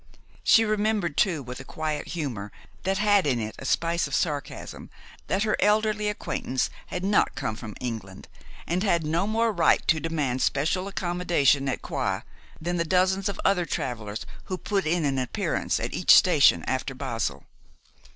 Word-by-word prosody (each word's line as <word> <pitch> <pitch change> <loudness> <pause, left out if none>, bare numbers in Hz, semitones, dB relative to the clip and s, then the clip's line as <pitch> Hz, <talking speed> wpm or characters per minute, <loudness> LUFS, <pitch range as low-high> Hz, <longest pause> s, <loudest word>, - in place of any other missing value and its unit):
She 225 - +6
remembered 210 -6 0
too, 165 -6 +1
with 125 +1 -7
a - - -7
quiet 155 +2 -4
humor 120 - -4 0.3
that 195 +1 +1
had 205 -4 +3
in 125 -4 +1
it 110 -1 -4
a - - -8
spice 170 +3 +1
of 140 - -2
sarcasm, 145 -4 -3 0.4
that 195 +2 +1
her 215 - +1
elderly 210 0 +2
acquaintance 130 -9 -2 0.2
had 180 +1 -4
not 205 +1 +2
come 130 -5 -3
from 110 -2 -8
England, 110 -6 -6 0.4
and 175 +2 -1
had 170 -6 +1
no 165 +6 0
more 225 +1 +1
right 175 -5 +3
to 160 - +4
demand 150 -6 -1
special 165 +7 0
accommodation 175 -7 +1
at 130 - -3
Coire - - -2 0.3
than 175 +2 -2
the 170 - +1
dozens 185 +3 +2
of 200 - -5
other 180 -3 +2
travelers 110 -6 -4 0.2
who 185 - -3
put 195 -2 -1
in 165 0 +1
an 135 -2 0
appearance 125 - -1
at - - -4
each - - +6
station - - +5
after - - -2
Basle. - - -3
170 Hz, 170 wpm, -26 LUFS, 135-195 Hz, 0.4 s, She